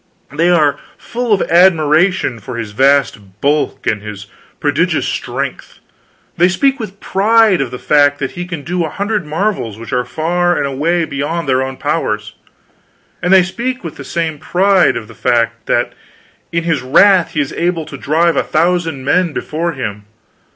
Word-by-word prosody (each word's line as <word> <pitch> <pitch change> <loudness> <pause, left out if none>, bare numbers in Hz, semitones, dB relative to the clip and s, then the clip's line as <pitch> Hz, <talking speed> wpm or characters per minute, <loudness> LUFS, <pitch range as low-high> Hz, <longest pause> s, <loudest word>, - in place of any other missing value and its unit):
They 165 +4 +2
are 150 -5 +3 0.2
full 240 -1 -4
of 200 - +3
admiration 170 -4 +3
of 100 - -18
his 115 -3 -5
vast 115 -5 +1
bulk 145 +4 0
and 105 - 0
his 105 -2 -8 0.3
prodigious - - +1
strength; - - -4 0.6
they 175 - +5
speak 270 +8 +1
with 200 -3 -7
pride 215 -2 +3
of 135 - -2
the 125 - -6
fact 145 +1 +3
that 135 -2 -3
he 175 0 -6
can 170 -5 -6
do 175 +2 -1
a 160 - -3
hundred 200 -3 -2
marvels 155 - -2
which 115 0 -8
are 125 0 +1
far 175 +5 0
and - - 0
away 160 +5 0
beyond 150 +3 -3
their 130 -1 +2
own 130 0 -4
powers; 105 -9 -2 0.9
and 180 - 0
they 190 -1 +7
speak 240 +7 -4
with 165 - -7
the 140 - -8
same 160 +1 -3
pride 185 +3 +2
of 110 -2 -7
the 115 - -13
fact 115 -1 0
that - - 0 0.6
in 170 0 -1
his 165 -3 0
wrath 180 +7 +4
he 155 - -1
is 145 -2 -1
able 170 -2 -1
to 150 - -9
drive 160 +5 +1
a - - +3
thousand 165 -4 0
men 175 +2 +2
before 165 +4 -3
him. 105 -6 -5
160 Hz, 175 wpm, -15 LUFS, 135-180 Hz, 0.9 s, they